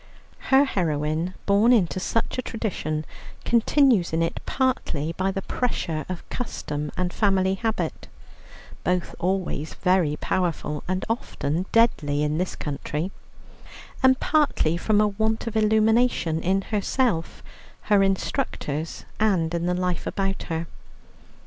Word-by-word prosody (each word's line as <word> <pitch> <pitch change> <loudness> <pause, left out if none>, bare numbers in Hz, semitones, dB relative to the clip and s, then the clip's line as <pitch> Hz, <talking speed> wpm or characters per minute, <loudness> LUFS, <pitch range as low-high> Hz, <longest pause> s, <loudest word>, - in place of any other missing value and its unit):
Her 270 +1 +6
heroine, 160 - -1
born 205 +4 +4
into 190 -6 +3
such 230 +6 -1
a - - +2
tradition, 160 -10 -3 0.4
continues 235 - +3
in 165 +1 +2
it, 165 - -2
partly 165 - 0
by 190 +3 0
the 195 0 -3
pressure 165 -10 -2
of 185 -2 -6
custom 150 - -4
and 180 -1 -1
family 190 -3 +2
habit, 220 +3 -2 0.8
both 180 -1 0
always 180 -4 -1
very 180 -5 +2
powerful 165 -4 -1
and 185 +1 -1
often 185 - -2
deadly 150 -11 +3
in 150 +2 0
this 185 - -2
country, 150 +4 -3 0.9
and 260 -1 +5
partly 290 - +2
from 205 +4 +2
a 210 - +4
want 220 +2 -1
of 230 -1 -4
illumination 220 -5 +3
in 190 +3 +1
herself, 210 -3 -1 0.4
her 205 -2 +4
instructors, 190 - -2
and 185 -6 +2
in 170 0 -1
the 180 - +1
life 180 -1 -1
about 195 -1 -1
her. 165 0 -2
185 Hz, 130 wpm, -25 LUFS, 165-220 Hz, 0.9 s, Her